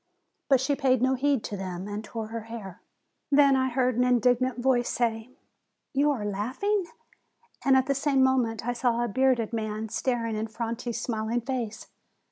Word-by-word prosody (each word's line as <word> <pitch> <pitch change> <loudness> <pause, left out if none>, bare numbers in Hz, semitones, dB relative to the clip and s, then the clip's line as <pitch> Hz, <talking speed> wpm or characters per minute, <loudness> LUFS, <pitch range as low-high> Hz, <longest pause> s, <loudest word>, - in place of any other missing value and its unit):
But 270 -2 +5
she 275 +3 +1
paid 260 -2 +2
no 260 +2 +2
heed 270 -2 +1
to 205 - -4
them, 185 -1 -5
and 210 +1 -5
tore 220 0 -6
her 225 -1 -5
hair. 205 -5 -8 0.5
Then 280 -1 +6
I 260 0 +1
heard 250 -1 +1
an 250 - +4
indignant 250 +1 +2
voice 245 -1 +2
say, 225 -1 -1 0.6
"You 285 +2 +3
are 245 -8 -1
laugh 210 - -4
ing 405 -3 +1 0.4
!" 470 - -30
and 270 -1 +5
at 260 - +3
the 275 - +1
same 275 -1 +2
moment 245 -4 +1
I 245 - +1
saw 240 -1 +1
a - - 0
bearded 240 0 +1
man 215 -1 -3
staring 230 0 -1
in 215 +1 -2
Franti's 230 +1 -4
smiling 230 0 -2
face. 235 -3 -4
240 Hz, 185 wpm, -27 LUFS, 220-260 Hz, 0.6 s, Then